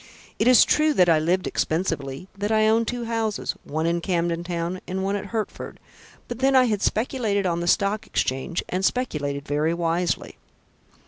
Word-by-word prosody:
It 220 - +2
is 250 -2 +7
true 305 -1 +2
that 180 -1 +4
I 160 -2 +5
lived 175 +4 0
expensively, 160 -3 -2
that 205 +2 -2
I 215 0 +4
own 225 +1 +3
two 245 +1 -3
houses, 225 -2 -2
one 155 +2 -3
in 170 +1 0
Camden 170 -2 -1
Town 175 +1 -3
and 190 +1 -3
one 195 +1 0
at 205 0 -4
Hertford; 220 0 -5 0.5
but 240 0 -6
then 270 +1 +3
I 260 - +7
had 215 -5 0
speculated 220 -4 0
on 170 -2 0
the 170 - -3
Stock 205 +3 +1
Exchange 135 +7 -1
and 185 +1 -2
speculated 150 - -1
very 150 +3 0
wisely. 170 0 -1
185 Hz, 180 wpm, -24 LUFS, 170-220 Hz, 0.5 s, is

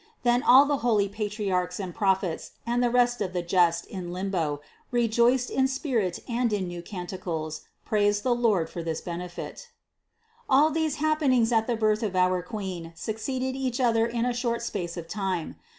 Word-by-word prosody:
Then 240 0 +3
all 260 +3 +7
the 285 0 +1
holy 225 -5 +2
Patriarchs 200 -3 -2
and 185 -3 -4
Prophets 190 -4 0
and 240 +1 +1
the 245 - +3
rest 245 -1 +2
of 185 -3 -2
the 180 -1 -1
just 175 -1 +2
in 180 -3 -6
limbo 175 -6 -2 0.3
rejoiced 240 +1 +2
in 265 0 +2
spirit 255 - -1
and 240 -1 0
in 200 -3 -1
new 175 0 -6
canticles 175 -4 -5 0.2
praised 205 -1 +2
the 255 - +3
Lord 220 -9 +2
for 170 - -6
this 165 -1 -3
benefit. 180 - -7 0.8
331. 265 - +5
All 300 +3 +6
these 315 -1 0
happenings 290 -6 +2
at 225 -1 +2
the 240 - +1
birth 215 -1 +2
of 205 -4 -2
our 185 0 +3
Queen 180 -5 -6
succeeded 255 +7 -3
each 260 -2 -2
other 230 -2 +3
in 235 0 -1
a 250 - 0
short 235 -1 -1
space 180 -6 -4
of 165 -1 -6
time. 190 -3 -3
215 Hz, 180 wpm, -27 LUFS, 180-245 Hz, 0.8 s, all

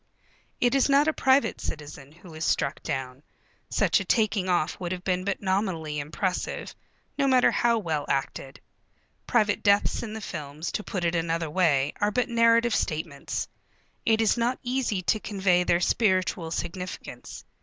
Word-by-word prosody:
It 245 0 +2
is 275 0 +3
not 280 +2 +4
a 315 - +2
private 265 0 +2
citizen 145 -2 -7
who 170 +1 -14
is 155 +1 -6
struck 140 -1 0
down. 130 0 -4 0.5
Such - - +2
a - - -3
taking 215 -5 +1
off 175 -3 0
would 175 -2 -4
have 180 -1 -4
been 185 -1 0
but 200 +1 -3
nominally 185 -6 -1
impressive, 165 +6 -3 0.5
no 275 - +3
matter 255 -2 +5
how 235 -1 +2
well 160 -8 -2
acted. 135 0 -3 0.7
Private 210 -4 +2
deaths 200 0 +3
in 220 -2 -6
the 220 - -5
films, 155 -5 -6
to 210 - -3
put 185 -4 -3
it 170 - +1
another 165 -1 -1
way, 150 -6 +2
are 205 - +3
but 250 +3 0
narrative 230 0 +4
statements. 155 -2 -2 0.6
It 225 0 +3
is 220 +2 +2
not 240 +2 0
easy 245 -6 -1
to 215 - +1
convey 190 -4 +1
their 170 -1 +2
spiritual 185 -4 +1
significance. 180 +2 -6
185 Hz, 165 wpm, -26 LUFS, 160-225 Hz, 0.7 s, matter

